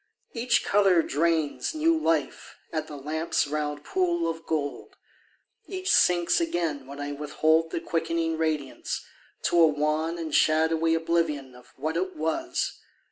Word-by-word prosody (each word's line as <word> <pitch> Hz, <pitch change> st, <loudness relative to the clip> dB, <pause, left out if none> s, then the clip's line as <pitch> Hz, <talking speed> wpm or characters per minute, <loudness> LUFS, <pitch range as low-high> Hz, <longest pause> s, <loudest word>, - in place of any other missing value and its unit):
Each 240 Hz, 0 st, +1 dB
colour 195 Hz, -4 st, +4 dB
drains 160 Hz, -, 0 dB
New 325 Hz, +2 st, +3 dB
life 165 Hz, -, -1 dB, 0.2 s
at 155 Hz, -1 st, -2 dB
the 150 Hz, -, -8 dB
lamp's 155 Hz, +4 st, -1 dB
round 150 Hz, 0 st, -3 dB
pool 170 Hz, -2 st, 0 dB
of 165 Hz, 0 st, -5 dB
gold; 145 Hz, -3 st, -3 dB, 0.7 s
Each 375 Hz, -1 st, -2 dB
sinks 175 Hz, -, +4 dB
again 165 Hz, -, -2 dB
when 140 Hz, +1 st, -9 dB
I 145 Hz, 0 st, -4 dB
withhold 155 Hz, +3 st, +1 dB
The 165 Hz, -, -3 dB
quickening 165 Hz, 0 st, -1 dB
radiance, 155 Hz, -4 st, -2 dB, 0.4 s
to 175 Hz, -, +2 dB
a 165 Hz, -, +8 dB
wan 155 Hz, +2 st, 0 dB
And 160 Hz, -3 st, -5 dB
shadowy 160 Hz, +2 st, +3 dB
oblivion 165 Hz, -5 st, -1 dB
Of 125 Hz, 0 st, -17 dB
what 155 Hz, +4 st, -2 dB
it 185 Hz, +1 st, -2 dB
was. 325 Hz, -, -2 dB
160 Hz, 140 wpm, -27 LUFS, 150-170 Hz, 0.7 s, a